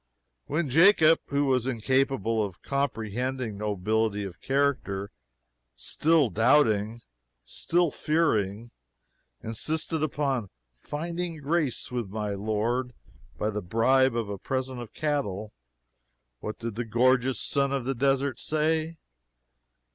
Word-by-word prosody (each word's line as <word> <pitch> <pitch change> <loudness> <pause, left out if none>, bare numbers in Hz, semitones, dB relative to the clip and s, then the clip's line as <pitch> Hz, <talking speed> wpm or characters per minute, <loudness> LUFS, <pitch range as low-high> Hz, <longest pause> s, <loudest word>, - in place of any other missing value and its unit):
When 155 +2 0
Jacob 165 0 +6
who 140 +1 +1
was 130 -2 +1
incapable 120 -3 +1
of 95 -4 -7
comprehending 125 -3 -2
nobility 105 +1 0
of 95 -3 -8
character 130 -8 0 0.6
still 150 - +2
doubting, 115 -1 +3 0.4
still 170 - +1
fearing, 115 - 0 0.7
insisted 155 +7 -2
upon 135 -8 -1 0.3
"finding 170 - -4
grace 150 -4 -1
with 120 -5 -3
my 105 0 -3
lord" 110 +5 -1 0.4
by 105 - -1
the 105 0 -3
bribe 120 +6 +3
of 115 -3 -1
a 100 -1 -5
present 130 +1 -3
of 115 -2 -9
cattle, 110 -9 -2 0.9
what 105 -1 -5
did 115 -1 -5
the 120 +3 -3
gorgeous 125 +1 +2
son 140 -1 +1
of 135 -3 -1
the 135 - 0
desert 135 0 +1
say? 160 +1 0
125 Hz, 115 wpm, -27 LUFS, 110-145 Hz, 0.9 s, Jacob